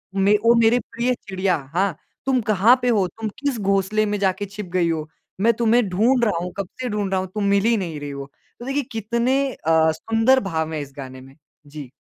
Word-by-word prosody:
मे 200 +2 +4
को 230 +3 +4
मेरे 230 +1 +4
प्रिय 245 +2 -2
चिड़िया। 190 -1 0 0.2
हाँ, 185 -3 0 0.3
तुम 260 -2 +2
कहाँ 215 +6 +5
पे 245 - +1
हो? 200 -5 +2
तुम 220 +3 -6
किस 280 -5 -1
घोंसले 200 +2 +1
में 205 0 -1
जाके 195 +1 0
छिप 200 +1 -8
गई 175 -2 +2
हो? 155 -1 -3 0.3
मैं 230 +3 +4
तुम्हें 230 -1 +2
ढूँढ़ 235 +7 +2
रहा 205 -6 0
हूँ, 180 - -5
कब 195 -3 -3
से 250 - -2
ढूँढ़ 205 -2 -2
रहा 190 - +1
हूँ, 190 - -5
तुम 210 - -1
मिल 200 0 +3
ही 230 0 +4
नहीं 165 -6 -4
रही 145 0 -6
हो। 140 0 -8 0.3
तो 240 - -8
देखिए 275 +1 -1
कितने 235 +4 0
अ, 160 0 +2
सुंदर 225 +10 +2
भाव 160 -1 -2
है 150 - -2
इस 140 -1 -9
गाने 130 -1 -8
में। 135 +1 -16 0.3
जी। 145 -3 -9
200 Hz, 225 wpm, -22 LUFS, 170-230 Hz, 0.3 s, कहाँ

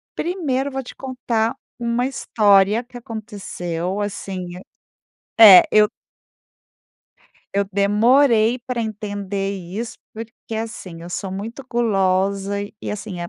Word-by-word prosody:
Primeiro, 290 -7 -1
eu - - -12
vou 270 0 -3
te - - -11
contar 240 -3 -2 0.2
uma 240 +1 0
história 205 -4 +3
que 245 0 -12
aconteceu 200 -6 -5
assim, 195 -3 -4 0.7
é 205 -5 +8
É - - +1
eu 210 0 +6 1.7
eu 200 0 +2
demorei 225 +4 +4
pra 245 0 -4
entender 205 -2 -4
isso, 190 +6 -6 0.2
porque 225 0 -9
assim, 220 -7 -6
eu 175 - -9
sou 190 +2 -4
muito 220 +8 -6
gulosa 195 -3 +1 0.3
e - - -4
assim, 205 -3 -6
eh, 175 - -5
215 Hz, 120 wpm, -21 LUFS, 195-235 Hz, 1.7 s, é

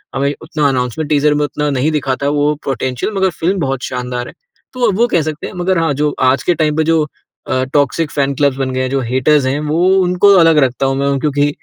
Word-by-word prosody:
हमें 140 +1 0
उतना 155 -2 -1
announcement 130 +4 -2
teaser 150 0 +3
में 150 0 0
उतना 150 +1 -2
नहीं 140 +3 0
दिखा 135 -3 -1
था 140 - +1
वो 145 0 +1
पोटेंशियल 130 - -2
मगर 190 0 +2
फ़िल्म 180 +3 -2
बहुत 135 -3 -2
शानदार 125 -1 -4
है। - - -11 0.4
तो 250 -2 +1
अब 195 - -1
वो 240 +1 +3
कह 170 -7 +1
सकते 155 0 -5
हैं - - -10
मगर 185 +1 0
हाँ 160 -3 +1
जो 150 -1 +1
आज 130 +1 +2
के 175 - +2
टाइम 155 -1 0
पे 160 - +3
जो 165 0 +2 0.5
अ, 130 0 0
टॉक्सिक 145 +2 +1
फैन 140 -1 0
क्लब्स 140 -1 +1
बन 130 -1 -2
गए 130 - -1
हैं 130 - -1
जो 135 +1 0
हेटर्स 130 +4 +1
हैं 135 +3 0
वो 155 +4 0
उनको 180 +3 +4
अलग 165 -2 +5
रखता 130 +1 -2
हूँ 135 0 0
मैं 140 0 0
क्योंकि 145 0 +1
145 Hz, 245 wpm, -15 LUFS, 135-160 Hz, 0.5 s, अलग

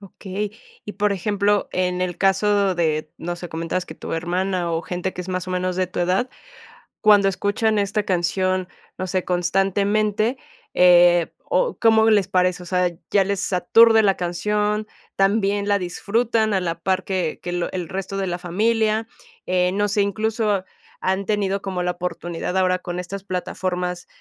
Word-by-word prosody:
Okey. 200 +1 -5 0.3
Y 210 - -6
por 205 +1 +1
ejemplo, 205 +1 0
en 180 0 0
el 180 -1 -2
caso 195 0 +2
de, 155 -2 -1
no 175 +1 -4
sé, 175 0 -8
comentabas 165 +3 -3
que 160 - -9
tu - - -7
hermana 175 +1 -1
o 165 +1 -1
gente 180 +1 -3
que 180 - -6
es 180 - -8
más 185 0 -3
o - - -5
menos 185 0 -1
de 185 -1 +1
tu 180 - -5
edad, 185 +8 +1 0.7
cuando 205 -2 +6
escuchan 205 +3 0
esta 205 +1 0
canción, 185 0 0 0.3
no 185 - -3
sé, 185 0 -1
constantemente, 205 +5 +1 0.3
eh, 175 -1 +5
¿o - - 0
cómo 220 -1 +4
les 205 -4 +3
parece? 180 -1 +1
O - - -11
sea, 180 0 +1 0.2
¿ya 195 -2 +4
les 200 0 -2
aturde 225 +5 +5
la 195 -2 +3
canción? 210 +4 -1 0.3
¿También 200 0 +1
la 200 0 +3
disfrutan 220 +4 0
a 190 - +2
la 170 -1 -3
par 190 +1 0
que 185 -5 -2
que 175 - -4
lo 175 -1 -2
el 180 -3 -4
resto 195 +2 -4
de 195 - -1
la 175 - -3
familia? 220 +4 0 0.4
Eh, 180 0 +1
no 205 +1 0
sé, 205 +1 +1
incluso 210 -1 0 0.4
han 190 +1 -1
tenido 200 -2 0
como 185 -2 -3
la 180 - 0
oportunidad 175 0 -4
ahora 185 -1 +2
con 180 0 -5
estas 195 +2 -7
plataformas 180 -1 -3
190 Hz, 175 wpm, -22 LUFS, 180-205 Hz, 0.7 s, cuando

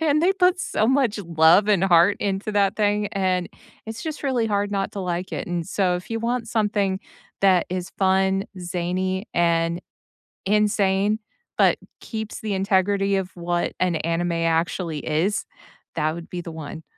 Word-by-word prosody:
and 305 -1 +2
they 370 +3 +4
put 365 -1 +2
so 215 - 0
much 255 -4 +2
love 170 +1 +4
and 200 -4 +3
heart 180 +1 +5
into 200 +1 -2
that 200 -1 +2
thing, 205 -1 +1
and 185 -2 0 0.4
it's 220 +1 -6
just 315 -2 -5
really 255 -5 +1
hard 205 -1 0
not 195 -1 -2
to 200 - -5
like 180 0 -3
it, - - -4
and 175 -2 -2
so 185 -3 +1
if 180 - -10
you 225 0 -2
want 235 0 -1
something 205 -4 0 0.4
that 190 -2 +4
is 180 0 -3
fun, 190 0 +2 0.2
zany, 185 +3 -2
and 170 0 +1 0.7
insane, 205 0 +2 0.4
but - - +4 0.2
keeps 220 -1 -6
the 215 -2 -3
integrity 195 +1 +1
of 190 -1 -4
what 175 0 -1
an 180 -2 +1
anime 170 +2 -1
actually 165 0 0
is, 165 +8 0 0.5
that 155 -1 0
would 170 -1 -9
be 180 - -5
the 170 - -8
one. 160 0 -8
190 Hz, 165 wpm, -23 LUFS, 175-210 Hz, 0.7 s, heart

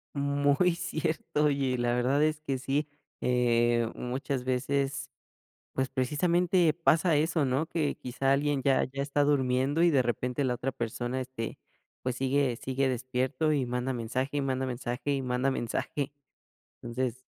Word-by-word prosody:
Mm, 140 0 -1 0.2
muy 180 -2 +4
cierto, 160 -3 -1
oye, 135 -3 +1
la 120 0 +1
verdad 130 +4 +2
es 155 0 +1
que 135 -3 -2
sí, 140 +3 -1 0.3
eh, 120 -1 +2
muchas 130 +1 -3
veces, 135 +2 -1 0.6
pues, 130 0 -1
precisamente 170 +5 +2
pasa 165 0 +3
eso, 160 0 +2
¿no?, 135 +5 0
que 160 -4 -1
quizá 135 +2 0
alguien 140 -1 +1
ya 135 -1 +3
ya 135 +1 -4
está 145 0 +1
durmiendo, 135 +2 +2
y 175 - +6
de 135 -4 +4
repente 125 +3 -1
la 125 -1 +1
otra 130 +2 -3
persona, 120 +2 -3
este, 125 -3 -5 0.4
pues, 125 -1 -2
sigue 135 -2 +1
sigue 135 +2 -1
despierto, 130 +4 0
y 135 -4 +1
manda 125 +2 -1
mensaje, 130 +4 -2
y - - +1
manda 130 -1 -1
mensaje, 125 +2 -3
y 135 - -1
manda 125 +2 0
mensaje. 135 +3 -2 0.7
Entonces 125 +1 -3
135 Hz, 155 wpm, -29 LUFS, 125-145 Hz, 0.7 s, y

